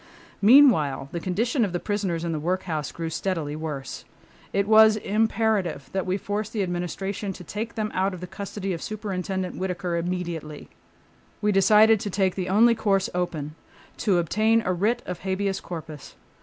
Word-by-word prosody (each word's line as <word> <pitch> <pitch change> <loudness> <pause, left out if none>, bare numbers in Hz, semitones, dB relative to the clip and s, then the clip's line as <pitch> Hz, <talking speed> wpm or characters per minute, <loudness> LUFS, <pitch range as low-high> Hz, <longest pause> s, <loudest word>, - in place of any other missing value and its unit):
Meanwhile 200 - +5
the 170 - -3
condition 230 - 0
of 195 -4 -1
the 175 - -1
prisoners 195 -5 -2
in 170 - -2
the 155 - -2
workhouse 165 -2 -2
grew 165 -1 -5
steadily 160 -4 -2
worse. 150 -4 -5 0.5
It 200 0 0
was 220 0 +7
imperative 215 -7 0
that 190 -1 -2
we 185 +1 0
force 205 +1 -3
the 210 -3 -1
Administration 190 +3 -3
to 180 - -10
take 215 +7 -5
them 215 -1 -2
out 190 0 0
of - - -9
the 180 - -6
custody 195 +1 -5
of 165 - -5
Superintendent 190 -3 -4
Whittaker 180 -2 -2
immediately. 170 -3 -4 0.7
We 210 0 +1
decided 210 +3 +5
to 205 - -4
take 190 -1 +1
the 185 -1 -3
only 225 +5 +5
course 200 -4 0
open—to 175 +3 -3
obtain 215 +6 +2
a 185 - +1
writ 215 +7 0
of 180 - -5
habeas 195 +1 -1
corpus. 160 -5 -8
190 Hz, 165 wpm, -25 LUFS, 175-210 Hz, 0.7 s, was